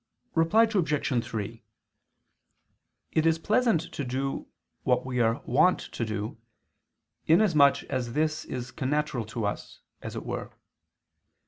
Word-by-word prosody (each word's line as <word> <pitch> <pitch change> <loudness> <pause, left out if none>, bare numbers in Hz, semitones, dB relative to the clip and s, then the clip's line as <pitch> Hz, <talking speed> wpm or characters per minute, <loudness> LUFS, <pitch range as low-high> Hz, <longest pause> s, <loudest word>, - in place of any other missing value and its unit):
Reply 165 +8 +4
Obj. 150 - +1
3: 110 -3 -5 1.5
It 160 - +2
is 160 0 +3
pleasant 215 0 +2
to 145 - -3
do 135 +2 -3 0.3
what - - +1
we 125 -1 -2
are 115 +3 +2
wont 165 +9 +4
to - - -5
do, 110 0 -4 0.9
inasmuch 160 -5 +5
as 120 -2 -3
this 155 +1 0
is 125 0 -5
connatural 135 -4 -1
to 110 0 -3
us, 105 - -5 0.2
as - - -6
it - - -5
were. - - -5
140 Hz, 125 wpm, -28 LUFS, 120-160 Hz, 1.5 s, inasmuch